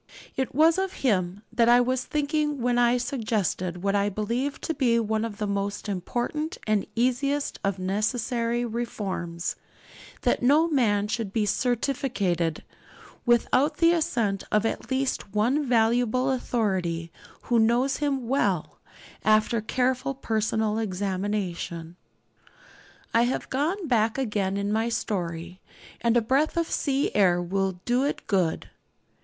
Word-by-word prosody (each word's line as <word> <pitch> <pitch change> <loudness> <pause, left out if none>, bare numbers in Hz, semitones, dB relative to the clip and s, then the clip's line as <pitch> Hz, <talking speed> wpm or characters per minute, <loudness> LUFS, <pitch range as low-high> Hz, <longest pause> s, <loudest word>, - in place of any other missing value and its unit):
It 260 -2 -2
was 320 +4 +5
of 385 0 -1
him 190 -3 +1
that 230 0 +4
I 240 +1 +7
was 255 +1 0
thinking 295 -1 -1
when 245 0 +1
I 240 0 +4
suggested 210 - -2
what 200 0 +1
I 200 0 +2
believe 235 +8 -2
to 325 - -2
be 240 -6 +2
one 220 -1 0
of 225 -3 -4
the 210 - -2
most 200 +1 -2
important 240 - -3
and 215 -2 +1
easiest 270 +4 0
of 195 -1 0
necessary 230 +5 -1
reforms 195 -7 -3 0.7
that - - +2
no 295 +6 +4
man 215 -9 +2
should 220 -2 -3
be 215 0 +1
'certificated' 220 - 0 0.6
without 255 +5 +3
the 335 0 +5
assent 230 - 0
of 210 +1 +2
at 225 - -3
least 260 -6 -2
one 250 +8 +2
valuable 245 +2 +2
authority 190 -10 -1 0.3
who 240 -1 +2
knows 240 +4 +2
him 275 -5 -1
well, 200 - 0 0.4
after 215 +1 +3
careful 255 +4 0
personal 220 -3 0
examination. 185 -4 -3 1.2
I 230 +1 +4
have 250 - -3
gone 320 +7 -1
back 225 -3 +2
again 205 -6 -1
in 200 +1 -1
my 225 +2 +1
story, 175 -5 -3 0.4
and 235 0 +3
a - - +4
breath 275 +8 +1
of 335 -1 0
sea 280 -1 0
air 180 -4 +4
will 190 +2 -1
do 245 +2 +2
it 285 - -2
good. 185 -6 0
230 Hz, 140 wpm, -26 LUFS, 200-260 Hz, 1.2 s, I